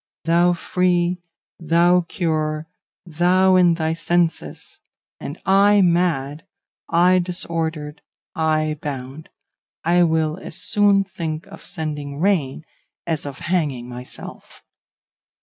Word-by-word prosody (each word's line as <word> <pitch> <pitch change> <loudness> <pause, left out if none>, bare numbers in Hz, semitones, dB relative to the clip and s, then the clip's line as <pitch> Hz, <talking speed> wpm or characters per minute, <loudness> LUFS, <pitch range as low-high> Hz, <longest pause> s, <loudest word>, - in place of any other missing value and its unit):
Thou 170 +2 +3
free, 175 0 0 0.4
thou 170 +2 +3
cured, 155 -3 -1 0.4
thou 180 +3 +3
in 175 -2 +5
thy 160 -1 -1
senses! 165 0 -2 0.4
and 145 - -7
I 200 +1 +5
mad, 165 -5 0 0.4
I 180 +2 +4
disordered, 165 -4 -3 0.3
I 155 -1 0
bound! 140 +1 -6 0.5
I 175 +2 +3
will 160 0 +1
as - - -9
soon 205 -1 +3
think 160 -4 -5
of - - -13
sending 150 -5 -5
rain 160 -6 0 0.4
as 160 -3 -3
of 140 -1 -7
hanging 150 -9 -1
myself. 125 +1 -9
165 Hz, 105 wpm, -21 LUFS, 155-180 Hz, 0.5 s, in